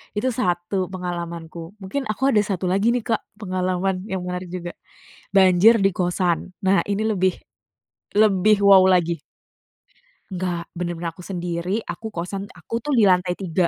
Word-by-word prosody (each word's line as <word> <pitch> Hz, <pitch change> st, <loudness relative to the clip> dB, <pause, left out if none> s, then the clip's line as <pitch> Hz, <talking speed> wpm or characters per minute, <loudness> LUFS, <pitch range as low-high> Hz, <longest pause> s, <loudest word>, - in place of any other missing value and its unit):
itu 255 Hz, +5 st, 0 dB
satu 185 Hz, -4 st, -1 dB
pengalamanku. 170 Hz, -1 st, -6 dB
Mungkin 265 Hz, +6 st, -3 dB
aku 265 Hz, +6 st, +1 dB
ada 210 Hz, -, +4 dB
satu 195 Hz, -3 st, -2 dB
lagi 200 Hz, +6 st, +2 dB
nih 240 Hz, -, -1 dB
Kak 225 Hz, -2 st, 0 dB
pengalaman 185 Hz, -1 st, -2 dB
yang 190 Hz, -3 st, -3 dB
menarik 180 Hz, 0 st, -4 dB
juga, 175 Hz, -1 st, -6 dB, 0.6 s
banjir 195 Hz, +3 st, +6 dB
di 195 Hz, -2 st, +2 dB
kosan, 180 Hz, 0 st, 0 dB
nah 195 Hz, -1 st, +2 dB
ini 205 Hz, +2 st, -1 dB
lebih, 190 Hz, -3 st, +1 dB, 0.8 s
lebih 205 Hz, 0 st, +4 dB
wow 195 Hz, -2 st, +7 dB
lagi. 175 Hz, -2 st, +2 dB, 1.1 s
Enggak, 175 Hz, -2 st, -3 dB
bener-bener 175 Hz, -1 st, -4 dB
aku 180 Hz, +2 st, -13 dB
sendiri, 180 Hz, +3 st, -3 dB
aku 225 Hz, -, -6 dB
kosan 195 Hz, +4 st, -4 dB
aku 205 Hz, +8 st, -6 dB
tuh 290 Hz, +4 st, -3 dB
di 230 Hz, -, +5 dB
lantai 180 Hz, -2 st, +3 dB
tiga. 180 Hz, -2 st, 0 dB
185 Hz, 150 wpm, -22 LUFS, 175-205 Hz, 1.1 s, wow